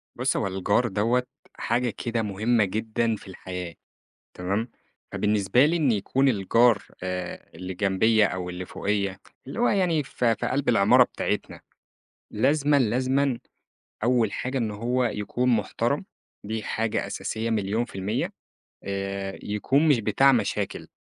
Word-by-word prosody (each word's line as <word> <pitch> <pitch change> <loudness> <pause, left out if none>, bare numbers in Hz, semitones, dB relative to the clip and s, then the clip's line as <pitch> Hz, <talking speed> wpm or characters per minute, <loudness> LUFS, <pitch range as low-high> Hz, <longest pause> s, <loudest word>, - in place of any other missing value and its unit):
بُص، - - 0
هو - - 0
الجار 100 +5 +1
دوّة 115 +5 +1 0.3
حاجة 120 +1 0
كده 115 +1 -2
مهمّة 110 +2 +1
جدًا 110 +3 -1
في 105 - -13
الحياة 90 -2 -7 0.6
تمام؟ 100 +6 -2 0.4
فبالنسبة 105 +4 +3
لي 160 +3 +2
إن 145 -6 +2
يكون 130 +6 +1
الجار 115 +1 +3 0.2
آآ 90 -1 -5
اللي 90 +2 -6
جنبيّا 105 +3 +3
أو 90 -1 -4
اللي 90 +1 -5
فوقيّ، 100 0 -2 0.3
اللي 140 - -6
هو 245 - +4
يعني 175 -6 +2
في 120 -3 0
في 120 - -3
قَلْب 135 +1 0
العمارة 105 -4 +6
بتاعتنا. - - -3 0.7
لازمًا، 145 +6 +2
لازمًا 130 +2 +1 0.7
أول 120 -3 +2
حاجة 130 +1 -2
إن 115 -3 -1
هو 120 +4 0
يكون 120 +2 -1
محترم، 120 - 0 0.4
دي 110 +1 -3
حاجة 110 +1 -1
أساسية 115 +1 -3
مليون 110 +2 0
في - - -15
المِيَّة 95 +3 -2 0.5
آآ 100 0 -4
يكون 135 +9 +1
مش 135 -6 +4
بتاع 115 +6 +4
مشاكل. 125 - -1
110 Hz, 140 wpm, -25 LUFS, 100-125 Hz, 0.7 s, العمارة